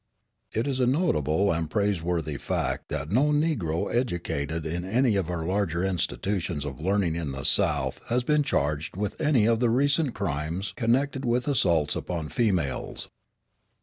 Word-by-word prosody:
It 110 - -1
is 135 -2 -1
a 125 - +3
notable 100 - +2
and 80 -1 -1
praiseworthy 85 -6 -1
fact - - -2
that 75 +2 -3
no 130 +7 +4
Negro 145 - 0
educated 80 - -2
in 85 +2 -2
any 115 +4 +2
of 95 -4 -1
our 85 -2 -3
larger 90 -2 0
institutions 90 -4 -1
of 75 +1 -6
learning 95 -2 +1
in 80 -5 -3
the 65 +1 -5
South 75 -8 +2
has 120 +1 +1
been 150 +3 +3
charged 75 - -1
with 105 0 -3
any 145 -8 +3
of 115 0 +3
the 120 -1 +2
recent 140 +3 +2
crimes 85 0 -3
connected 135 +3 +1
with 125 +1 0
assaults 85 - +2
upon 80 -4 -4
females. 90 - -1
95 Hz, 155 wpm, -26 LUFS, 80-120 Hz, -, no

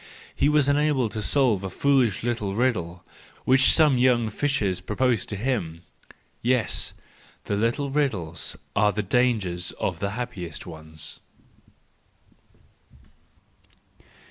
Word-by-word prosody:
He 145 - +2
was 150 -2 +3
unable 145 -4 +2
to 110 - -4
solve 115 -5 +2
a 95 - -3
foolish 130 -4 +1
little 110 -5 -2
riddle 90 -8 -1 0.4
which 130 +1 +5
some 150 -6 +4
young 120 -3 +3
fishers 105 -9 -1
proposed 110 +3 0
to 105 - -4
him! 95 -8 -3 0.6
Yes, 125 -1 0 0.5
the 100 - -2
little 120 +6 0
riddles 105 - -1 0.2
are 105 0 +3
the 105 0 -2
dangers 100 -6 0
of - - -3
the 100 - -1
happiest 95 -10 -5
ones 80 -2 -6
115 Hz, 115 wpm, -25 LUFS, 95-130 Hz, 0.6 s, which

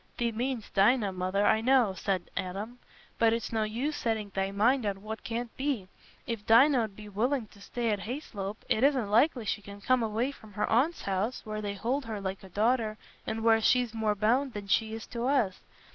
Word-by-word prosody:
"Thee 235 -1 0
mean'st 240 0 -3
Dinah, 205 +1 +4
Mother, 185 +2 0
I 220 - +4
know," 250 -4 +4
said 185 -1 -2
Adam. 205 +7 -4 0.4
"But 225 -1 +5
it's 230 -1 -2
no 220 - +1
use 240 +8 -1
setting 220 -4 -2
thy 195 0 0
mind 230 +6 +2
on 200 -1 -3
what 220 +1 -6
can't 235 0 -4
be. 260 -9 -2 0.4
If 230 -3 -4
Dinah 245 +1 +6
'ud 205 -3 -11
be 210 0 -10
willing 235 +5 0
to 200 - -18
stay 235 +2 -2
at 205 - 0
Hayslope, 210 -3 -6
it 220 - +1
isn't 260 -7 +2
likely 240 +1 +3
she 205 - -1
can 200 0 -10
come 255 +4 +2
away 225 +4 0
from 220 -6 -15
her 210 - -1
aunt's 285 +9 +2
house, 200 +6 -2
where 215 0 -4
they 200 -1 -3
hold 250 +7 -1
her 220 -2 -4
like 190 0 -4
a 190 - -11
daughter, 215 +2 +1 0.3
and 225 0 -2
where 225 -1 +5
she's 245 0 +3
more 220 -2 0
bound 245 +6 +1
than 205 -1 -6
she 220 +2 +1
is 225 - -7
to 240 +1 -3
us. 245 -9 +1
220 Hz, 210 wpm, -29 LUFS, 205-245 Hz, 0.4 s, Dinah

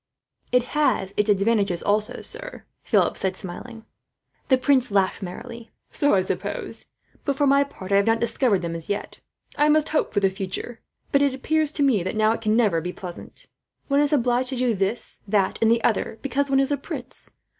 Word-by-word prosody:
"It 250 -1 +4
has 245 -10 +1
its 210 +1 +1
advantages 200 -3 +2
also, 210 +1 0
sir," - - -4 0.2
Philip - - +2
said, 190 -1 -1
smiling. 225 +5 -8 0.6
The 260 - +4
prince 260 -1 +2
laughed 195 -2 +1
merrily. 230 +5 -8 0.2
"So 290 -7 +2
I 190 - +2
suppose; - - -4 0.4
but 280 - 0
for 290 +1 +2
my 280 0 +5
part, 195 -9 -10
I 200 - +5
have 200 - +2
not 225 0 +3
discovered 225 -4 +1
them, 170 -1 -3
as 165 -1 -7
yet. 205 - -4 0.4
I 295 +1 +4
must 305 0 +3
hope 310 - 0
for 205 - +1
the 195 -1 +2
future; 195 +5 -5 0.3
but 280 - +4
it 280 -2 +2
appears 310 +2 +1
to 290 - 0
me, 250 -8 +3
now, 215 +4 +1
that - - +1
it - - -16
can 215 -1 +1
never 205 -8 +2
be 180 +2 -4
pleasant. 180 -1 -10 0.4
One 280 0 +3
is 290 -1 +2
obliged 250 -2 +2
to 265 - -1
do 250 -1 +1
this, 200 +3 -2
that, 195 -2 +1
and 225 - +4
the 230 0 +2
other 220 0 0
because 280 +1 -1
one 270 0 +3
is 275 +1 +1
a 285 - +1
prince. 275 -2 -7
230 Hz, 205 wpm, -24 LUFS, 200-275 Hz, 0.6 s, my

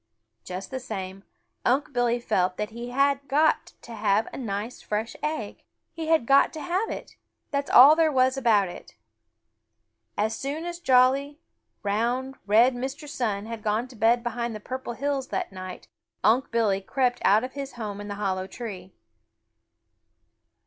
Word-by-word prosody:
Just 185 +1 -7
the 260 - -3
same, 195 -5 -6 0.4
Unc' 280 +4 +1
Billy 245 -1 +1
felt 185 -6 0
that 210 +1 -3
he 235 +2 -7
had 275 +2 +1
got 300 +4 +2
to 235 - -10
have 215 0 +1
a - - -6
nice 215 0 -4
fresh 215 +2 -3
egg. 305 +1 -3 0.3
He 325 -1 -5
had 320 -6 +3
got 275 +3 +5
to 315 - -6
have 370 +7 -1
it. - - -7 0.3
That 280 0 0
is - - -12
all 280 +5 +9
there 320 -1 +3
was 260 -1 +3
about 225 -7 +3
it. 175 - -11 1.2
As 220 +1 0
soon 290 +7 -4
as 345 0 -5
jolly, 270 +1 +3 0.4
round, 240 +6 0
red 230 +5 +5
Mr. 265 +4 -5
Sun 215 -7 -2
had 230 -1 -6
gone 215 +4 0
to 250 - -13
bed 230 +2 +3
behind 240 -1 -3
the - - -6
Purple 255 +2 -5
Hills 275 +1 -2
that - - -3
night, 185 -1 -8 0.4
Unc' 240 +5 +3
Billy 215 -4 +1
crept 245 +4 0
out 210 +4 +5
of 255 - -5
his 275 0 -6
home 210 -4 -5
in 205 - -7
the 205 - -4
hollow 190 -2 -2
tree. 195 -6 -8
240 Hz, 170 wpm, -26 LUFS, 210-270 Hz, 1.2 s, all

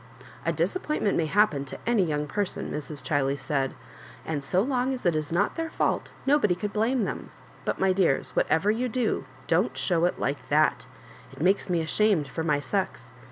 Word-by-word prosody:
^' - - -17 0.2
A - - +4
disappointment 305 - 0
may 160 - +1
happen 195 -6 +3
to 130 - -7
any 235 -4 +3
young 150 -3 -1
person," 200 +6 -2
Mrs. 150 -2 -4
Ghiley 140 -2 +1
said, 135 0 -1 0.2
" - - -18
and 150 -3 -2
so 180 +8 +2
long 260 0 0
as 250 - -10
it 175 -2 +3
is 155 0 -2
not 190 +5 +1
their 325 0 -2
fault - - 0 0.2
nobody 275 -10 +3
could 205 +3 -4
blame 230 +3 +1
them; - - -5 0.4
but^ - - 0
my 190 -1 +3
dears, 180 -8 +1
whatever 185 +6 +3
you 245 +3 -1
do, 245 -1 0 0.2
don't - - +1
show 175 -2 +2
it 180 - 0
like 140 -2 -2
that. 155 +1 +2 0.4
It - - -13
makes 190 +5 +2
me 175 -2 +2
ashamed 170 -1 +2
for 160 - -4
my 150 -3 +2
sex. 190 +5 -3
180 Hz, 200 wpm, -27 LUFS, 150-215 Hz, 0.4 s, A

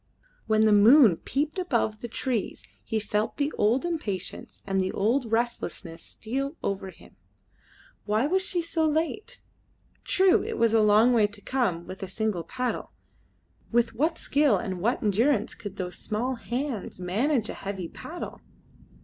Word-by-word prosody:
When 220 0 +4
the 215 - +5
moon 215 - +7
peeped 300 +6 -2
above 235 -11 0
the 240 - -4
trees 235 -1 -2 0.2
he 220 - -1
felt 210 +1 -2
the 290 +1 0
old 235 +9 +2
impatience 220 - -4
and 195 -1 0
the 185 0 -1
old 230 +3 0
restlessness 225 -7 -2
steal 275 +7 -4
over 195 -1 -2
him. - - -17 0.9
Why 215 +4 +1
was 375 +5 +2
she 360 -3 +1
so 325 -1 0
late? 320 +7 -2 0.6
True, 380 0 +4
it 455 - -4
was 230 -1 +3
a 225 - +5
long 215 +4 +5
way 220 -3 +4
to 205 0 -11
come 200 -11 -1
with 185 +3 -9
a 195 - -4
single 200 -2 -2
paddle. 250 +8 -4 0.8
With 235 0 +2
what 310 +8 0
skill 280 -7 +2
and 185 -3 -4
what 235 +6 0
endurance 220 +3 +2
could 205 -3 -8
those 180 -1 -5
small 235 +5 -2
hands 240 -3 -4
manage 220 +7 0
a - - -4
heavy 195 -3 -5
paddle! 340 - -8
225 Hz, 160 wpm, -27 LUFS, 205-275 Hz, 0.9 s, moon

